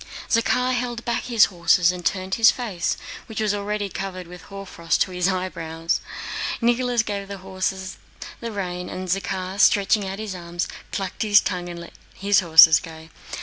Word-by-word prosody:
Zakhár 250 +2 +2
held 240 -1 -3
back 235 -1 -1
his 235 -3 +5
horses 175 +1 +4
and 180 -1 -7
turned 185 +1 -1
his 225 +1 +6
face, 210 -9 -2 0.3
which 220 - -6
was 215 -1 +1
already 205 0 -2
covered 185 -1 -6
with 180 +1 -11
hoarfrost 195 -4 -3
to 190 - -9
his 180 0 0
eyebrows. 165 -3 -2 0.6
Nicholas 240 0 +2
gave 200 -2 -4
the 200 0 -7
horses 190 0 -4 0.4
the 230 -1 -5
rein, 180 -3 -4
and 185 0 -6
Zakhár, 190 0 -2
stretching 200 0 +4
out 190 +1 -5
his 215 -2 -5
arms, 175 -1 -4 0.2
clucked 195 -2 -4
his 210 -1 +6
tongue 175 -1 -3
and 170 -1 -7
let 170 - -11 0.2
his 200 0 +3
horses 160 -3 +8
go. 160 -2 -11
190 Hz, 170 wpm, -23 LUFS, 180-210 Hz, 0.6 s, horses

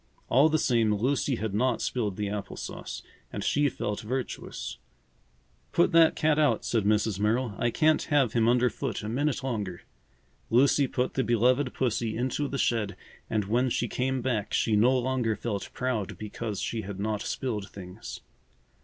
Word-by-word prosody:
All 140 +6 +5
the 155 - +2
same, 115 -7 +2
Lucy 130 +4 +1
had 110 -2 -3
not 125 +3 +1
spilled 105 -7 -2
the 105 -1 -1
apple 100 0 -5
sauce, - - -6 0.3
and - - -4
she 145 0 +2
felt 105 -4 -3
virtuous. 125 - -4 0.9
"Put 170 - +4
that 165 -1 +6
cat 155 -1 +2
out," 140 -8 +2
said 115 -4 +1
Mrs. 105 -1 +2
Merrill. 110 +2 +1
"I 120 - +2
can't 155 +5 +3
have 140 -6 +2
him 115 -1 +3
under 125 0 +3
foot - - -4
a - - -4
minute 135 +4 -1
longer." 105 -9 -3 0.7
Lucy 135 +3 +4
put 125 0 -1
the 130 - +1
beloved 125 +3 +2
pussy 115 -3 -1
into 130 +4 -1
the 140 - -3
shed 110 -6 0 0.3
and 105 -2 0
when 120 +5 +1
she 120 - 0
came 130 +1 -1
back 115 -5 -1
she 110 - +2
no 125 +5 +4
longer 125 -3 0
felt 105 -4 -4
proud 125 -6 -2
because 105 -1 -5
she 115 - -2
had 100 -1 -7
not 105 0 -1
spilled 110 -7 -3
things. 95 +2 -9
120 Hz, 170 wpm, -28 LUFS, 105-130 Hz, 0.9 s, that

